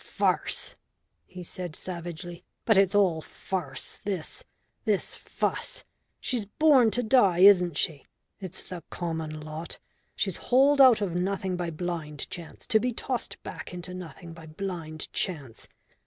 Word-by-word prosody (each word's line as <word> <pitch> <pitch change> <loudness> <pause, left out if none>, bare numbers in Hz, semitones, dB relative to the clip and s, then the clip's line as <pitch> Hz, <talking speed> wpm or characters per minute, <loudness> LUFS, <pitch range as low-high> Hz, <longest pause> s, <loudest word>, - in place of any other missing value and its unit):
"Farce," - - +1 0.5
he 180 -1 -9
said 175 -2 -6
savagely. 175 -1 -6 0.2
"But 220 - +5
it's 195 0 +4
all 180 -6 +4
farce 175 -4 -5
this 190 -6 -4 0.4
this 210 -4 0
fuss, - - -2 0.4
She's 235 -6 -1
born 270 -1 +5
to 245 +3 0
die, 205 -7 +4
isn't 180 -5 +7
she? 145 -4 -1 0.3
It's 190 -2 -3
the 180 -2 -7
common 160 -3 -4
lot. 155 +2 -6 0.4
She's - - -1
hauled 275 +3 +4
out 250 -5 +8
of 190 -4 -1
nothing 185 +1 -1
by 175 -1 -2
blind 160 -3 -4
Chance, 170 -2 -7
to 220 - +4
be 250 +3 0
tossed 245 +1 -4
back - - -7
into 180 +1 -6
nothing 175 -1 -8
by 165 -1 -11
blind 160 -2 -5
Chance. 140 - -2
180 Hz, 140 wpm, -28 LUFS, 165-205 Hz, 0.5 s, out